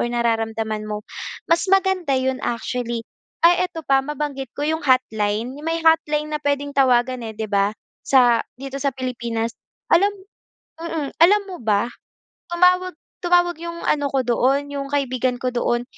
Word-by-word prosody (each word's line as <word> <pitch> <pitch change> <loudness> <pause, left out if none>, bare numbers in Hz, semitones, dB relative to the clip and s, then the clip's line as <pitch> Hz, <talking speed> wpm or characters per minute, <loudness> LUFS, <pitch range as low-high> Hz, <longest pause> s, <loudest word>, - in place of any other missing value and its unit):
nararamdaman 225 -2 -1
mo, 210 0 -4 0.5
mas 335 +3 +3
maganda 380 -6 +2
'yon 260 0 0
actually. 235 0 -2 0.4
Ay 355 +1 +6
eto 330 -2 -7
pa, 270 0 +4
mabanggit 285 -3 -4
ko 290 - -3
'yong 320 0 -1
hotline, 225 -3 +1
'yong 300 - -10
may 330 0 0
hotline 305 -2 +3
na 300 - 0
puwedeng 285 0 -1
tawagan 255 -2 +3
eh, 220 - -5
'di 220 -1 -4
ba, 200 0 +2 0.3
sa, 245 -4 +4
dito 275 +1 -6
sa 275 0 0
Pilipinas 235 -3 -3 0.4
alam 400 +3 +5 0.7
mm, 320 -4 -4
alam 410 +4 +6
mo 360 - -7
ba, 215 +1 +1 0.6
tumawag 365 +1 +3 0.3
tumawag 350 -1 +3
'yong 340 0 -6
ano 290 -1 +1
ko 270 -1 +2
doon, 265 +4 +2
'yong 275 -1 -4
kaibigan 255 -3 0
ko 255 - 0
doon. 240 0 0
270 Hz, 155 wpm, -22 LUFS, 235-320 Hz, 0.7 s, Ay